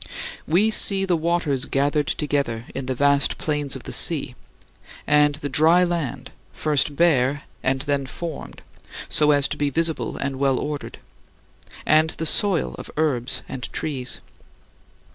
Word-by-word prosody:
We 195 +8 +3
see 195 -2 +2
the 180 -2 +1
waters 160 -5 0
gathered 145 +1 0
together 140 -6 -2
in 135 -1 -5
the 130 - -1
vast 140 +1 +2
plains 150 -3 -2
of - - -8
the - - -6
sea; - - +3 0.7
and 150 0 +3
the 145 -1 -4
dry 160 +6 +4
land, 145 -7 -3 0.2
first 150 -1 0
bare 140 -4 +2 0.2
and 130 +1 0
then 140 -1 -1
formed, 165 +3 -7 0.5
so 150 -1 +3
as 145 -2 +4
to - - -4
be 145 -1 0
visible 160 +3 -2
and 135 -1 -3
well 135 -2 +2
ordered; 150 -1 -5 0.9
and 155 +1 +4
the 160 - -5
soil 185 +1 +3
of - - -9
herbs 135 -6 -1
and 125 -3 -6
trees. 130 -5 -3
145 Hz, 145 wpm, -22 LUFS, 135-160 Hz, 0.9 s, dry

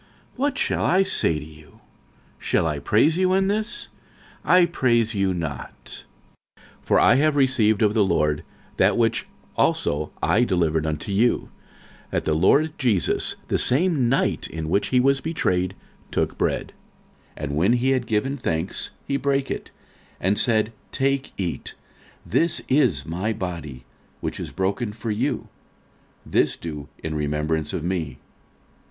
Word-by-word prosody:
What 275 +1 0
shall - - 0
I 190 +2 +4
say 80 - +1
to 75 - -7
you? 75 -1 -16 0.6
shall - - +1
I 75 -3 -1
praise 145 - +3
you 185 0 +3
in 190 0 +2
this? 215 +3 -2 0.6
I 180 -1 +5
praise 120 -8 +1
you 95 -2 +1
not. 80 -7 -6 0.5
46:011:023 - - -26 0.2
For - - +3
I - - +6
have 155 +1 +3
received 115 -6 +3
of 105 -1 +3
the 110 -2 +4
Lord 75 -5 +1 0.3
that - - +3
which 115 -1 +1 0.3
also 75 +1 +1
I 120 - +3
delivered 80 -7 +1
unto 80 +5 -3
you, 115 +5 +2 0.6
That - - -2
the 80 - +1
Lord 140 - +3
Jesus 115 - +1
the - - 0
same 140 -2 +2
night 135 - +1
in 80 -1 -5
which 100 +4 +1
he 125 - +3
was 135 +1 +3
betrayed 95 - -1 0.3
took - - -1
bread: - - -1 0.6
46:011:024 - - -8
And 70 -1 -2
when 90 +10 +3
he 125 +2 +2
had 130 -2 0
given 125 +6 0
thanks, 85 -6 -2 0.2
he 140 - 0
brake 140 -1 0
it, - - -5 0.5
and 100 +3 +1
said, 110 -2 +1 0.2
Take, 135 0 0
eat: 90 -4 -4 0.5
this 170 0 +1
is 125 - +2
my 95 +8 -2
body, 85 -10 -6 0.4
which - - -4
is - - -5
broken 100 +4 -1
for 110 +1 -4
you: 105 - -1 0.8
this - - +1
do 75 -3 -7
in 80 - -3
remembrance 75 +1 -1
of - - -3
me. 85 -7 -2
105 Hz, 155 wpm, -23 LUFS, 80-135 Hz, 0.8 s, I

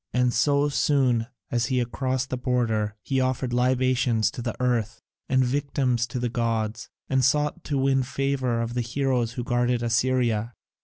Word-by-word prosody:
And 125 -1 +2
so 140 +3 +2
soon 130 -5 +2 0.2
as 120 -1 +1
he 130 - 0
had 120 -1 -1
crossed 130 0 -2
the - - 0
border 115 -5 0
he 135 -1 0
offered 130 -1 -1
libations 125 -2 +2
to 125 - -7
the 120 -1 -3
Earth 120 -3 0 0.3
and 130 0 +3
victims 130 -2 0
to 120 - -5
the 125 0 -1
gods, 115 -2 -2 0.2
and 130 -1 +1
sought 150 +5 +1
to 145 - -1
win 135 0 +2
the 130 - -1
favour 130 -4 -1
of 115 +1 -4
the 125 - 0
Heroes 125 -1 -1
who 125 -2 -4
guard 120 0 +1
Assyria. 120 -1 +1
125 Hz, 175 wpm, -25 LUFS, 120-130 Hz, 0.3 s, and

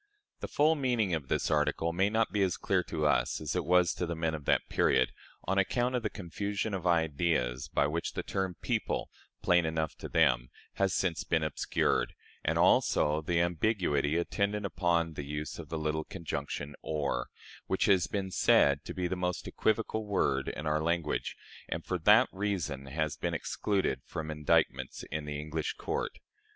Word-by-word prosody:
The - - -4
full 150 +2 +3
meaning 120 - +1
of 75 -5 -2
this - - 0
article 75 +2 +1
may 95 +3 +2
not 110 +1 +1
be 105 - 0
as 95 -3 +1
clear 95 -2 +1
to 75 -2 -2
us 65 -4 +2
as - - -3
it - - 0
was 90 +2 +4
to 90 - -3
the 85 - -2
men 80 0 -1
of 75 -3 -6
that - - +2
period, - - +2 0.3
on 95 +2 +1
account 120 +5 +1
of 125 - 0
the 110 - -1
confusion 100 +3 -3
of 90 -2 -2
ideas 80 -6 +1
by 70 - +1
which 80 +3 -2
the - - -3
term 95 -2 -2
"people" - - -1 0.3
plain 90 -1 +4
enough 80 -1 -1
to - - -6
them - - +3 0.3
has 100 -1 +2
since 90 -4 0
been 80 -2 +1
obscured, 70 -5 0 0.3
and - - +1
also 75 +1 +3
the 85 +2 0
ambiguity 85 -4 +1
attendant 100 +4 -1
upon 85 -3 +1
the 70 - -5
use 75 +1 -5
of - - -8
the 80 - -3
little 80 0 -1
conjunction 75 -4 -5
or, 70 -5 -2 0.4
which 95 - +1
has 95 -4 +4
been 95 -2 -3
said 70 -4 +4
to - - -6
be 90 -1 -1
the 95 - -2
most 90 0 -2
equivocal 110 0 0
word 70 -9 +1
in 75 - -4
our 75 0 +1
language, 85 -1 -1 0.3
and - - -3
for - - -2
that - - +6
reason 85 -9 -2
has 75 +2 -1
been - - -2
excluded 100 -2 -1
from 80 -1 -4
indictments 75 -1 +1
in 75 0 -3
the 75 -1 -4
English 75 +1 -3
courts. 455 +3 -3
85 Hz, 185 wpm, -31 LUFS, 75-95 Hz, 0.4 s, that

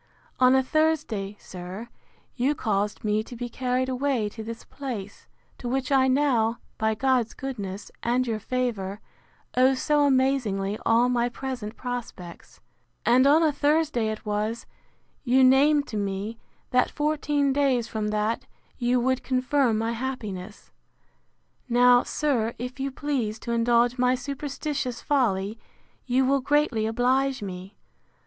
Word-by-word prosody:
On 255 0 +6
a 265 - +4
Thursday, 270 -10 0
sir, 185 +5 -8 0.5
you 270 +4 +1
caused 205 -3 -1
me 210 0 +1
to 235 +3 -10
be 240 +1 -4
carried 255 +1 -1
away 260 -4 0
to 220 +1 -8
this 230 +1 -7
place, 225 -8 -7 0.3
to 245 - -4
which 265 +1 -1
I 265 -1 +4
now, 255 -4 +2 0.2
by 220 0 +1
God's 250 -1 +1
goodness, 205 -7 -6
and 245 +2 +1
your 225 -3 -2
favour, 215 -5 -2 0.6
owe 260 +2 +5
so 295 +2 +2
amazingly 255 -8 +1
all 230 +2 +4
my 245 -1 +1
present 245 -3 -5
prospects; 240 -9 -7 0.5
and 255 +3 +5
on 310 +4 +5
a 310 - +4
Thursday 290 -4 +1
it 215 0 -6
was, 215 +2 -2 0.6
you 260 0 +4
named 285 +3 +5
to 215 - -4
me, 200 +3 -3 0.3
that 250 0 +3
fourteen 295 -2 0
days 265 -4 +2
from 215 -1 -3
that 215 +2 -1 0.3
you 245 0 +2
would 260 +1 +1
confirm 255 -2 +1
my 225 +1 -1
happiness. 220 -6 -6 1.0
Now, 245 +1 +6
sir, 240 -7 -1
if 250 +3 -6
you 270 +1 -1
please 265 -6 -2
to 235 - -6
indulge 235 +1 +2
my 250 0 +3
superstitious 275 -1 -4
folly, 220 -6 0 0.5
you 260 +1 +3
will 275 +1 +2
greatly 275 -6 +1
oblige 255 +2 +1
me. 190 0 -7
245 Hz, 140 wpm, -26 LUFS, 220-270 Hz, 1.0 s, On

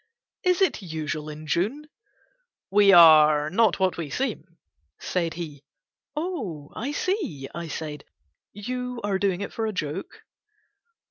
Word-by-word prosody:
"Is 365 +1 +3
it 375 - +1
usual 155 -3 -4
in 155 +1 -9
June?" 220 - -1 0.8
"We 200 0 +6
are 155 -3 +7
not 215 -1 +3
what 190 -1 +1
we 165 -4 -4
seem," 210 - -4 0.4
said 170 -3 -2
he. 150 -5 -7 0.5
"Oh, 230 - -4
I 260 +6 -3
see," 295 - -2
I 170 -1 -5
said, 150 -1 -6 0.5
"you 250 +4 -5
are 200 -2 0
doing 195 -2 0
it 200 - -5
for 225 -1 -2
a - - -1
joke." 160 +1 -5
185 Hz, 135 wpm, -25 LUFS, 155-230 Hz, 0.8 s, are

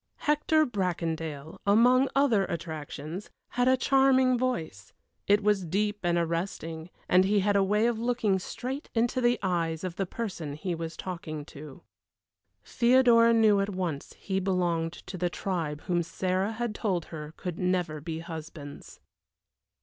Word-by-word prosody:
Hector 305 +1 +3
Bracondale, 165 - -3
among 245 +6 +5
other 245 -8 +3
attractions, 160 +2 -6 0.2
had 245 +1 +1
a 260 0 +5
charming 265 -1 +4
voice; 165 - -3 0.3
it 205 +1 +4
was 205 -2 +2
deep 205 +5 -1
and 175 -1 +1
arresting, 165 -1 -3 0.2
and 180 +1 +5
he 200 +1 +2
had 205 +1 +1
a 200 - +4
way 210 +3 +2
of 235 -2 +1
looking 230 -5 +1
straight 260 +9 -5
into 240 +2 +1
the 240 0 +3
eyes 165 -3 -1
of 180 -2 -4
the 195 - -1
person 180 -9 -5
he 175 +4 -3
was 165 0 -5
talking 160 -5 -6
to. 150 +2 -11 0.8
Theodora 235 -1 +5
knew 220 -3 +5
at 195 +1 0
once 170 -6 -3
he 190 -1 -3
belonged 175 -3 0
to 185 +1 -9
the 175 0 +1
tribe 165 -5 -3
whom 175 -1 0
Sarah 185 +5 -1
had 235 -1 -3
told 190 -6 -1
her 155 0 -7
could 180 -3 -5
never 180 -4 0
be 160 +1 -5
husbands. 160 -3 -9
185 Hz, 150 wpm, -28 LUFS, 165-225 Hz, 0.8 s, among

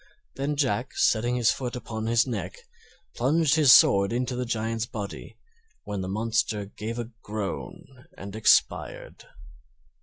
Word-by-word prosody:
Then 140 +2 -2
Jack, 130 -3 -1
setting 120 +2 +2
his 120 -3 +3
foot 125 -2 -4
upon 110 -2 -5
his 115 +1 +3
neck, 100 -8 -5 0.6
plunged 145 +4 +2
his 150 -5 +6
sword 100 +1 +6
into 125 +1 -2
the 125 0 -3
Giant's 115 0 -2
body, 105 -3 -7 0.5
when 100 -2 -4
the 95 - -4
monster 110 0 -1
gave 110 +3 -6
a 120 0 -5
groan 105 - -7
and 100 +1 -8
expired. 110 - +1
115 Hz, 140 wpm, -26 LUFS, 105-125 Hz, 0.6 s, his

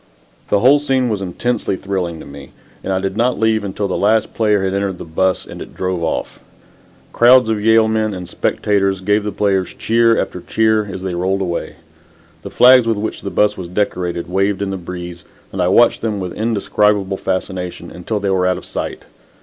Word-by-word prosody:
The 100 - +2
whole 140 +5 +6
scene 130 -3 0
was 105 -3 -2
intensely 100 +3 -2
thrilling 90 -4 -3
to - - -11
me, 70 -1 -12 0.3
and - - -3
I 95 - +1
did 95 0 -3
not 120 +3 +1
leave 110 -1 +2
until 100 +1 -3
the 95 - -2
last 110 +2 +2
player 105 -3 +1
had 95 0 -1
entered 100 -2 -2
the - - -8
"bus" 95 +3 0
and - - -10
it - - -10
drove 90 -2 -2
off. 80 - -3 0.7
Crowds 125 0 +6
of 110 -2 0
Yale 110 0 +5
men 110 -1 0
and 90 -2 -6
spectators 95 +1 0
gave 105 +2 +1
the 105 - -3
players 95 -2 0
cheer 115 0 +2
after - - -3
cheer 110 -1 +1
as 95 - -7
they 95 -2 -3
rolled 95 +3 -1
away. 85 -3 -3 0.7
The - - -8
flags 125 -1 +6
with 115 -2 +1
which 110 +2 -4
the - - -4
"bus" 105 0 +2
was 90 - -7
decorated 90 -2 -2
waved 95 +2 0
in 100 - -3
the - - -2
breeze, 90 -1 -8 0.3
and 95 - -3
I 90 - +2
watched 115 +6 +4
them 110 -3 -2
with 90 -2 -5
indescribable 105 -3 0
fascination 95 -2 -4
until 105 +4 -4
they 100 -1 -1
were 90 -1 +2
out 90 - +1
of - - -10
sight. - - -5
100 Hz, 205 wpm, -18 LUFS, 90-110 Hz, 0.7 s, whole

